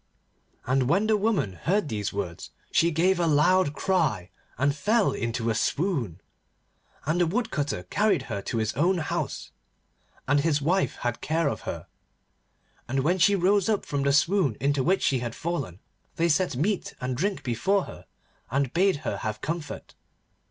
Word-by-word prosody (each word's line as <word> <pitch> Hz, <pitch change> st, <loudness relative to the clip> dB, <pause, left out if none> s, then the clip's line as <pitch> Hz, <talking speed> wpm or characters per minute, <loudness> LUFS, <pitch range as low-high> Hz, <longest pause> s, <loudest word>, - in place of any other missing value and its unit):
And 130 Hz, 0 st, +1 dB
when 200 Hz, +8 st, +3 dB
the 215 Hz, 0 st, +3 dB
woman 205 Hz, -, 0 dB
heard 175 Hz, -, 0 dB
these 105 Hz, -6 st, -3 dB
words 90 Hz, -4 st, -5 dB, 0.2 s
she 170 Hz, -, +3 dB
gave 175 Hz, +3 st, +2 dB
a 170 Hz, -, +2 dB
loud 155 Hz, +1 st, +3 dB
cry, 155 Hz, -, 0 dB, 0.3 s
and 140 Hz, +2 st, +1 dB
fell 215 Hz, +6 st, +2 dB
into 115 Hz, -1 st, -2 dB
a -, -, +1 dB
swoon. 125 Hz, -, -1 dB, 0.8 s
And 160 Hz, +4 st, +1 dB
the 175 Hz, -, +3 dB
Woodcutter 160 Hz, -, -2 dB
carried 200 Hz, -, +1 dB
her 105 Hz, -6 st, -4 dB
to 115 Hz, -, -3 dB
his 110 Hz, -1 st, 0 dB
own 175 Hz, +8 st, +2 dB
house, 160 Hz, -, -3 dB, 0.8 s
and 145 Hz, +1 st, +3 dB
his 150 Hz, 0 st, +2 dB
wife 175 Hz, +7 st, +1 dB
had 120 Hz, -1 st, -1 dB
care 160 Hz, 0 st, 0 dB
of -, -, -2 dB
her, -, -, -5 dB, 1.0 s
and 135 Hz, +2 st, 0 dB
when 175 Hz, +7 st, +1 dB
she 200 Hz, +4 st, +5 dB
rose 195 Hz, +2 st, +2 dB
up 210 Hz, -2 st, 0 dB
from 145 Hz, -1 st, -2 dB
the 140 Hz, 0 st, +2 dB
swoon 150 Hz, -, +2 dB
into 140 Hz, +2 st, +1 dB
which 185 Hz, +8 st, +1 dB
she 130 Hz, -, +2 dB
had 120 Hz, -1 st, -4 dB
fallen, 140 Hz, -, -4 dB, 0.4 s
they 170 Hz, +1 st, +1 dB
set 170 Hz, -1 st, +1 dB
meat 185 Hz, +9 st, -1 dB
and 125 Hz, 0 st, -2 dB
drink 195 Hz, +8 st, -1 dB
before 155 Hz, -, +1 dB
her, -, -, -11 dB, 0.4 s
and 135 Hz, 0 st, 0 dB
bade 190 Hz, +3 st, +3 dB
her -, -, -1 dB
have 110 Hz, -1 st, -4 dB
comfort. 160 Hz, -2 st, -5 dB
150 Hz, 170 wpm, -26 LUFS, 125-185 Hz, 1.0 s, she